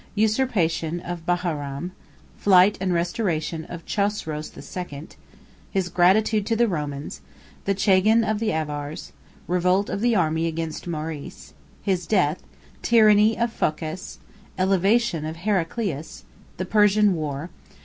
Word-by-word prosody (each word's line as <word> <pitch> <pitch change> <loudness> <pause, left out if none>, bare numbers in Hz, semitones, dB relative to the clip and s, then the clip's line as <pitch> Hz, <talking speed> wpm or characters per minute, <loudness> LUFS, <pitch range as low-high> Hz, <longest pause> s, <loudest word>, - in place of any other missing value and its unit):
—Usurpation 205 -8 +1
Of 175 -1 -7
Baharam.—Flight 175 +4 +1
And 190 -1 0
Restoration 170 -3 -1
Of 170 -2 -9
Chosroes 200 -7 -2
II.—His 180 +3 -7
Gratitude 205 +5 +3
To 230 - +1
The 235 +1 +3
Romans.—The 150 +4 -5
Chagan 205 +3 +4
Of 215 -1 0
The 225 -1 0
Avars.—Revolt 160 +5 -2
Of 200 - -3
The 240 0 +3
Army 160 -2 +1
Against 165 0 -4
Maurice.—His 165 +3 -5
Death.—Tyranny 210 +4 +2
Of 235 -1 0
Phocas.—Elevation 185 +4 -1
Of 155 +1 -4
Heraclius.—The 180 -2 -4
Persian 210 0 +4
War. 155 0 -4
180 Hz, 95 wpm, -24 LUFS, 160-210 Hz, -, Chagan